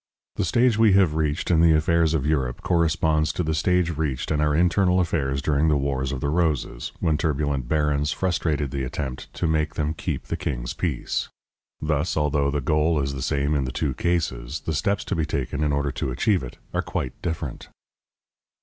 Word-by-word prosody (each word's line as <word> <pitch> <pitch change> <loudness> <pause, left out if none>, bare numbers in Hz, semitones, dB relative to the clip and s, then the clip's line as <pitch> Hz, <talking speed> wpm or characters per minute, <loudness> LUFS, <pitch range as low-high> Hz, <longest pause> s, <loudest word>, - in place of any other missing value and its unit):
The - - +1
stage 120 +3 +3
we 110 -3 +6
have 95 -5 +4
reached 80 +1 -1
in 80 -2 +4
the 85 -1 +6
affairs 80 +1 +2
of 70 -3 0
Europe 65 -5 -1
corresponds 80 -2 +2
to 90 - -1
the 80 0 -1
stage 85 +2 +1
reached 75 -4 -2
in 75 -1 +1
our 75 -1 +2
internal 90 +2 +3
affairs 70 -6 0
during 75 +1 +2
the 75 -2 +3
Wars 70 -1 -1
of 65 -2 -4
the 70 - 0
Roses, 75 -7 -1
when 75 -2 +1
turbulent 70 -5 -1
barons 75 0 +1
frustrated 80 -6 -1
the 70 -1 -2
attempt 65 0 -5
to - - -2
make 75 -1 0
them 75 0 -1
keep - - -4
the - - -3
king's - - -3
peace. - - -2 0.5
Thus, 75 +2 -1
although 75 -1 +1
the 70 0 -1
goal 75 +3 +2
is 70 0 -1
the 65 - -5
same 70 +1 0
in 70 -3 +1
the 65 - -3
two 70 -1 -1
cases, 70 -8 -1
the 80 - -3
steps 100 +7 0
to 100 - -2
be 80 - 0
taken 70 0 -2
in 75 - +1
order 70 0 0
to 65 - -3
achieve 95 - +1
it 65 - -8 0.2
are - - +1
quite 65 - -3
different. 80 -6 -4
75 Hz, 200 wpm, -24 LUFS, 70-80 Hz, 0.5 s, we